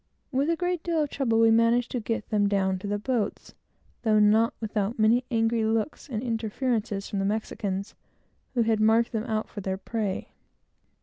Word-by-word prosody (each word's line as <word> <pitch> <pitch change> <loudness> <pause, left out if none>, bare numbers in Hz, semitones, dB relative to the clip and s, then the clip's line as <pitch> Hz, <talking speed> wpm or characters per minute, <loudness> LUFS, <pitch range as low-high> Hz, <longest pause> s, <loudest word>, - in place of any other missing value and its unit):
With 275 +3 +1
a 335 - +2
great 355 0 -1
deal 330 -2 0
of 290 - -5
trouble, 230 -5 +1
we 225 0 +6
managed 230 +2 +3
to 250 - -1
get 225 -1 -3
them 205 -1 +2
down 190 -2 +1
to 200 - -6
the 205 0 0
boats, 220 -1 -2 0.5
though 220 -2 +3
not 215 +2 +4
without 215 0 -2
many 230 +3 +3
angry 225 -1 +1
looks 225 +7 -1
and 230 -2 -3
interferences 225 -3 -2
from 200 - -3
the 205 +3 +1
Spaniards, 195 -1 -4 0.6
who 235 - +3
had 220 -1 +1
marked 225 +2 +3
them 220 -1 -2
out 220 -3 -2
for 205 - -7
their 190 0 -2
prey. 205 -1 -3
225 Hz, 185 wpm, -27 LUFS, 210-235 Hz, 0.6 s, we